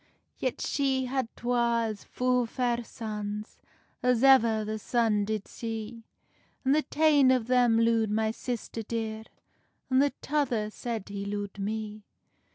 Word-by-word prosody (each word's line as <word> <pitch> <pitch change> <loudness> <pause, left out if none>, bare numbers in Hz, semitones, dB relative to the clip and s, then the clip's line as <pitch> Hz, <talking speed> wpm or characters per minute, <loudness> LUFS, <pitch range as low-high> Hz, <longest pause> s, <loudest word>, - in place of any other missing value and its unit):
"Yet 255 -2 -2
she 270 -2 0
had 260 -1 -1
twa 235 -1 +1
as 215 -2 -4
fu 250 -1 +1
fair 240 0 -1
sons 210 -2 -6 0.4
As 250 -1 +2
ever 230 -5 +5
the 215 +1 -3
sun 220 -2 +1
did 215 -1 -3
see, 225 0 -6 0.6
An 265 - +3
the 305 +2 +4
tane 295 -4 +4
of 255 -3 +3
them 245 -2 +4
lood 230 -1 +3
my 220 +1 +1
sister 230 -1 -5
dear, 220 0 -4 0.7
An 260 - +5
the 285 +1 +4
tother 245 -8 0
said 225 -3 -5
he 200 0 -4
lood 205 0 -4
me." 215 +1 -4
230 Hz, 145 wpm, -28 LUFS, 215-250 Hz, 0.7 s, ever